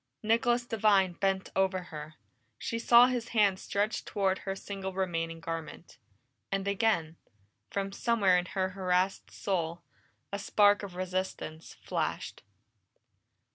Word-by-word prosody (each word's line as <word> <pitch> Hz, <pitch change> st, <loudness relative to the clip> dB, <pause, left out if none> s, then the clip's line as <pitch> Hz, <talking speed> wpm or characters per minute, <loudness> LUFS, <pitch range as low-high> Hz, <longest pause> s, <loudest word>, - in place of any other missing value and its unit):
Nicholas 240 Hz, +2 st, +2 dB
Devine 205 Hz, -5 st, +3 dB
bent 190 Hz, +2 st, -1 dB
over 190 Hz, -1 st, +1 dB
her; 155 Hz, +1 st, -7 dB, 0.4 s
she 230 Hz, -, -3 dB
saw 235 Hz, +1 st, +7 dB
his 250 Hz, -2 st, -1 dB
hand 200 Hz, -3 st, +4 dB
stretch 205 Hz, +3 st, -1 dB
toward 190 Hz, -2 st, 0 dB
her 195 Hz, 0 st, -4 dB
single 195 Hz, -1 st, -5 dB
remaining 165 Hz, -3 st, -2 dB
garment. 165 Hz, 0 st, -7 dB, 0.5 s
And 195 Hz, 0 st, -1 dB
again, 200 Hz, -6 st, +1 dB, 0.5 s
from 195 Hz, 0 st, -2 dB
somewhere 200 Hz, -3 st, +3 dB
in 180 Hz, 0 st, +1 dB
her 190 Hz, 0 st, +1 dB
harassed 185 Hz, 0 st, 0 dB
soul, 170 Hz, -3 st, -2 dB, 0.5 s
a 200 Hz, -, -1 dB
spark 205 Hz, 0 st, +4 dB
of 195 Hz, -3 st, -8 dB
resistance 185 Hz, -3 st, -4 dB
flashed. -, -, -3 dB
190 Hz, 125 wpm, -30 LUFS, 180-205 Hz, 0.5 s, saw